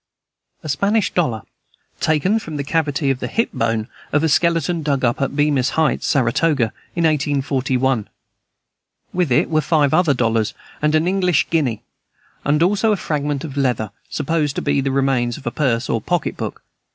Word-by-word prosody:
A 155 - -6
Spanish 200 +8 +1
dollar, 125 - 0 0.6
taken 170 +8 +2
from 160 -8 -7
the 140 - -2
cavity 145 -2 0
of 130 - -2
the - - -3
hip 230 - 0
bone 115 -1 -1 0.2
of 150 +1 +2
a 160 - +2
skeleton 170 +2 +2
dug 140 -4 0
up 120 +3 0
at 135 0 -1
Bemis's 145 -3 +1
heights, 160 -1 +1
Saratoga, 130 -1 +1 0.2
in 170 - 0
1841. 135 -5 0 1.0
With 175 -6 0
it 125 - +2
were 155 -1 +3
five 150 -2 +2
other 165 -6 +3
dollars 115 -3 0 0.3
and 150 +1 +2
an 155 +2 +2
English 180 -3 +1
guinea, 135 -10 0 0.6
and 150 +3 +2
also 205 +4 +2
a 210 - +1
fragment 145 -4 -2
of 145 -4 -6
leather, 125 -6 0 0.2
supposed 150 -1 -1
to - - -3
be 145 -1 +1
the 135 - -1
remains 135 -3 +1
of - - -13
a - - -1
purse 130 -5 0
or 115 - -1
pocket 175 -2 -1
book. - - -6
145 Hz, 175 wpm, -20 LUFS, 130-165 Hz, 1.0 s, were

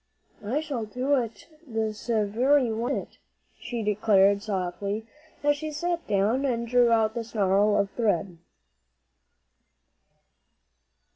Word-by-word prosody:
"I 250 +9 -1
shall 275 -8 -4
do 250 +6 -1
it 230 -6 -1 0.2
all 235 - -13
this 220 0 -2
very 235 +4 +2
one 230 +2 -1
minute," - - -7 0.4
she 235 -2 -4
declared 200 -1 +3
softly, 200 +2 -3 0.4
as 290 0 +3
she 310 +1 -5
sat 345 +3 -3
down 210 +6 +1
and 235 -4 -1
drew 245 0 +4
out 220 -1 +3
the 235 - -3
snarl 205 -2 +2
of 200 -1 0
thread. 190 -6 -1
225 Hz, 125 wpm, -26 LUFS, 205-250 Hz, 0.4 s, drew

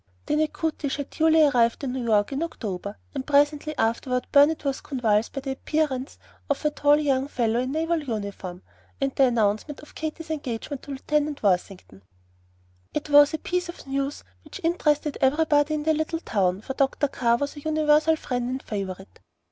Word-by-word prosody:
The 300 - 0
"Natchitoches" 310 -2 -1
had 285 -1 -6
duly 320 0 +4
arrived 245 -3 +3
in 265 - -2
New 260 -1 -3
York 215 -1 +2
in 275 +2 -2
October, 205 - -5 0.2
and 275 -2 -3
presently 290 +1 +2
afterward 250 +3 0
Burnet 290 +2 +4
was 275 -1 -1
convulsed 225 -5 0
by 275 - -4
the 270 0 -4
appearance 270 -1 -2 0.3
of 285 +2 -1
a 300 - +3
tall 290 0 +4
young 275 -3 +1
fellow 235 -4 0
in 255 +1 -2
naval 325 +2 0
uniform, 200 -7 -5 0.4
and 275 -1 0
the 270 - +4
announcement 230 +3 0
of 300 - -15
Katy's 315 +1 -5
engagement 275 -2 -4
to 285 - -9
Lieutenant 295 +1 -1
Worthington. 180 - -1 0.9
It 300 0 -3
was 290 +1 +7
a - - -2
piece 360 +2 -2
of 345 - -9
news 275 +1 -3 0.2
which - - -10
interested 300 -3 +1
everybody 295 +2 +3
in 300 - -3
the 315 +1 +3
little 315 +1 -2
town, 195 - 0
for 265 - -5
Dr. 275 +2 +1
Carr 235 -3 +1
was 285 +4 -3
a - - -8
universal 310 +1 +3
friend 245 -5 -3
and 260 +1 -4
favorite. 195 -2 -6
280 Hz, 180 wpm, -25 LUFS, 240-300 Hz, 0.9 s, was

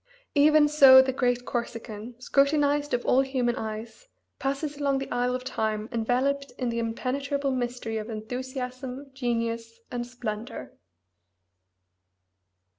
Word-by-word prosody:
Even 300 +1 +6
so 275 -3 +9
the 265 0 +3
great 245 -1 0
Corsican, 235 -1 -5
scrutinized 290 +2 +2
of 245 - -4
all 260 - +4
human 255 -3 0
eyes, 220 - -6 0.3
passes 280 +2 -2
along 280 -1 +1
the 270 - -5
aisle 245 +1 +1
of 255 - -4
Time 220 -4 -2
enveloped 260 +4 0
in 250 -2 -1
the 235 0 -2
impenetrable 275 +5 -1
mystery 245 -3 -2
of 215 +1 -5
enthusiasm, 255 +4 -5
genius, 230 -3 -2
and 240 -1 -3
splendor. 235 -2 -6
250 Hz, 120 wpm, -27 LUFS, 230-275 Hz, 0.3 s, so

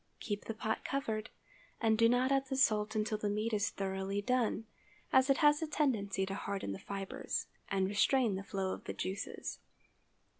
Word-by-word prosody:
_ - - -41
Keep 205 -2 -3
the 225 - -4
pot 220 0 -2
covered, 220 -5 -2 0.5
and 220 -2 +3
do 230 +1 +5
not 250 +2 +3
add 270 0 +2
the 265 - -2
salt 215 -5 +3
until 215 0 0
the 210 - 0
meat 215 +2 -1
is 205 0 +2
thoroughly 195 0 -2
done, 230 -1 +1 0.5
as 260 +1 +6
it 275 - +5
has 295 +1 +6
a 320 - -1
tendency 220 -11 +1
to 195 - -4
harden 195 - -3
the 95 - -5
fibres, 195 -1 -3 0.2
and 195 -1 +2
restrain 220 +3 +3
the 190 - -2
flow 195 -1 -2
of - - -9
the - - -3
juices. 190 +2 -4
215 Hz, 190 wpm, -34 LUFS, 200-250 Hz, 0.5 s, as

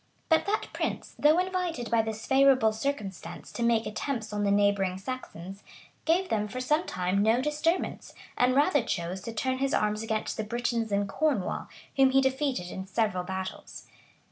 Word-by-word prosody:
But 320 +2 +3
that 425 +1 -1
prince, - - -3
though 305 +2 +5
invited 360 -9 -1
by 230 -1 +4
this 220 0 -5
favorable 265 -5 +5
circumstance 215 -5 -4
to - - -6
make 235 -1 +2
attempts 220 0 -3
on 205 0 -1
the 200 - +2
neighboring 200 -2 +2
Saxons, 195 -4 -7 0.4
gave 360 +3 +2
them 210 -1 0
for 230 +5 -5
some 300 +6 +1
time 185 +2 0
no 220 +3 +4
disturbance, 300 +5 -1 0.2
and 250 +1 +3
rather 290 +1 +4
chose 180 -4 -3
to 230 - -6
turn 260 +3 -1
his 275 0 +1
arms 210 0 +1
against 220 -1 -2
the 220 - -1
Britons 235 0 -1
in 200 0 +1
Cornwall, 245 -1 -1 0.3
whom 270 -1 +6
he 265 +1 +4
defeated 265 -8 0
in 190 0 -6
several 195 -2 0
battles. 190 +1 -6
230 Hz, 170 wpm, -28 LUFS, 205-275 Hz, 0.4 s, whom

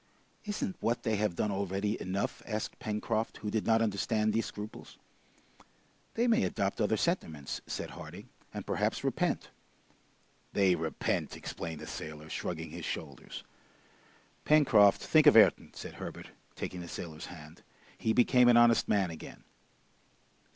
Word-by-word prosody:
"Isn't 205 -3 -3
what 115 +1 0
they 110 -2 +1
have 105 -4 0
done 105 - 0
already 100 +2 -1
enough?" 95 +2 -2
asked 110 -1 -4
Pencroft, 110 +1 -2
who 105 - -4
did 110 -1 -1
not 115 0 +4
understand 110 +1 0
these 115 0 0
scruples. 105 +1 -9 1.2
"They 235 - +2
may 235 -2 +4
adopt 95 - -1
other - - +2
sentiments!" 75 -3 -2
said - - -4
Harding, - - -10 0.2
"and - - -6
perhaps - - -1
repent." - - -1 1.0
"They 95 -2 +4
repent!" 80 -2 -2
exclaimed 80 -2 -6
the - - -7
sailor, 80 0 -7
shrugging 80 -3 -4
his 85 +1 -7
shoulders. 70 -5 -6 1.0
"Pencroft, 115 -10 +5
think 155 -1 +5
of 145 - +8
Ayrton!" 110 - +5
said - - -7
Herbert, - - -8 0.2
taking 90 - -5
the 85 - -8
sailor's 80 -2 -7
hand. 80 -1 -12 0.3
"He 110 - 0
became 125 +1 +5
an 120 -1 +7
honest 120 -1 +5
man 95 -4 +2
again!" 80 - -10
105 Hz, 145 wpm, -31 LUFS, 85-115 Hz, 1.2 s, of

